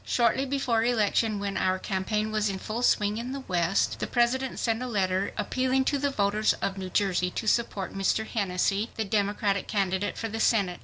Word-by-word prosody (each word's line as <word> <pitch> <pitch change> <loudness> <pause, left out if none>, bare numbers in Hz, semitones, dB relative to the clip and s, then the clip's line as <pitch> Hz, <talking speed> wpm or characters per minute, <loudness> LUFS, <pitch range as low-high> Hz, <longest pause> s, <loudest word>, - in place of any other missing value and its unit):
Shortly 250 +3 +1
before 255 -4 +1
election, 225 -2 +1
when 200 0 -3
our 185 0 +1
campaign 210 +3 -2
was 215 -1 +1
in 195 - -3
full 215 +5 -4
swing 210 -3 +2
in 250 +3 -5
the 275 - -5
West, 180 -5 0
the - - -2
President 255 +2 +1
sent 225 0 0
a 255 - -3
letter 195 -4 0
appealing 260 +5 0
to 285 - +1
the 285 +1 +1
voters 210 -3 +1
of 195 - -3
New 190 -1 -5
Jersey 180 -2 +1
to 220 - -5
support 210 -3 0
Mr. 195 +3 0
Hennessey, 200 0 0
the 220 - -2
Democratic 200 -1 0
candidate 195 0 -1
for 225 - -3
the 225 +1 -5
Senate. 200 -6 +2
210 Hz, 195 wpm, -27 LUFS, 195-235 Hz, -, swing